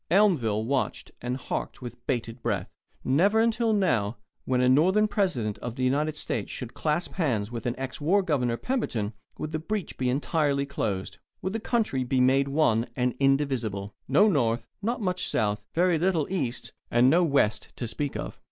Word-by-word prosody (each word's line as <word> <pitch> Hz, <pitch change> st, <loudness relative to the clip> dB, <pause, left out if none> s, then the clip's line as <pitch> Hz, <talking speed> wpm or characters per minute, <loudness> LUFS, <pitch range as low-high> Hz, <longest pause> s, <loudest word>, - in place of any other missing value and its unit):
Elmville 150 Hz, -, +3 dB
watched 135 Hz, +1 st, -1 dB
and 125 Hz, +1 st, -2 dB
harked 135 Hz, -, -4 dB
with 120 Hz, -1 st, -8 dB
bated 120 Hz, -2 st, -2 dB
breath. 105 Hz, -7 st, -2 dB, 0.3 s
Never 190 Hz, +12 st, +3 dB
until 230 Hz, 0 st, +2 dB
now 125 Hz, -, +1 dB, 0.3 s
when 130 Hz, -1 st, +1 dB
a 125 Hz, -, +4 dB
Northern 185 Hz, +11 st, +4 dB
President 175 Hz, -, -1 dB
of 120 Hz, -1 st, -5 dB
the 130 Hz, -, -2 dB
United 150 Hz, +4 st, +1 dB
States -, -, -2 dB
should 125 Hz, -3 st, -6 dB
clasp 155 Hz, +3 st, -1 dB
hands 120 Hz, -, 0 dB
with 115 Hz, 0 st, -4 dB
ex 130 Hz, +2 st, -5 dB
war 190 Hz, +7 st, +3 dB
Governor 125 Hz, -8 st, 0 dB
Pemberton 120 Hz, -, -2 dB, 0.2 s
would 155 Hz, -, -4 dB
the 155 Hz, -, -2 dB
breach 205 Hz, +4 st, -4 dB
be 130 Hz, -1 st, +1 dB
entirely 140 Hz, +1 st, +1 dB
closed 100 Hz, -9 st, -3 dB, 0.2 s
would 190 Hz, -, -2 dB
the 225 Hz, -, -1 dB
country 215 Hz, -, 0 dB
be 125 Hz, +1 st, 0 dB
made 135 Hz, +2 st, +4 dB
one 135 Hz, -6 st, +2 dB
and 125 Hz, -1 st, +1 dB
indivisible 130 Hz, -8 st, +1 dB
no 155 Hz, +11 st, +5 dB
North, 120 Hz, -, +1 dB, 0.2 s
not 235 Hz, +3 st, -1 dB
much 185 Hz, -1 st, -1 dB
South, 105 Hz, -1 st, 0 dB
very 175 Hz, -1 st, +3 dB
little 170 Hz, -3 st, +2 dB
East, 130 Hz, -10 st, -2 dB, 0.2 s
and 120 Hz, +2 st, +4 dB
no 170 Hz, +7 st, +5 dB
West 110 Hz, -9 st, +1 dB
to 120 Hz, -, -4 dB
speak 140 Hz, +5 st, -2 dB
of. -, -, -6 dB
135 Hz, 175 wpm, -27 LUFS, 120-175 Hz, 0.3 s, no